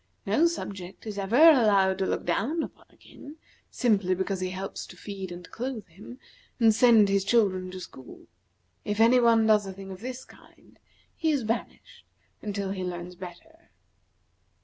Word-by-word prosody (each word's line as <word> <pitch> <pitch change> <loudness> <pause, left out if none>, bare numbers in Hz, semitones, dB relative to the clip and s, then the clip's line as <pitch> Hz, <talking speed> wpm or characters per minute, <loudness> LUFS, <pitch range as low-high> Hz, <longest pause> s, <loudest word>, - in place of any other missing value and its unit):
No 330 +3 +3
subject 195 - -6
is 210 -2 -5
ever 200 +4 -1
allowed 215 -11 +5
to 190 - 0
look - - -2
down 310 +10 0
upon - - -11
a - - -26
king, 290 +2 -13 0.3
simply 200 -7 +1
because 190 +1 -2
he 185 0 -2
helps 190 +1 -6
to - - -14
feed 195 -3 -7
and 175 0 -9
clothe 245 -3 -5
him, 205 +9 -12 0.4
and 225 -2 +5
send 225 -2 +5
his 195 0 +1
children 195 -4 +1
to 185 0 -8
school. 130 -7 -12 0.6
If 205 +1 -3
any 235 +3 +6
one 230 -2 +4
does 210 -2 +3
a 190 - -6
thing 195 0 -10
of 185 - -9
this 255 +1 -7
kind, - - -21 0.4
he 320 - -1
is 285 -5 +1
banished 225 +2 -5 0.4
until 200 -2 -3
he 190 -1 -4
learns 175 0 -5
better." 185 - -13
205 Hz, 170 wpm, -27 LUFS, 190-240 Hz, 0.6 s, any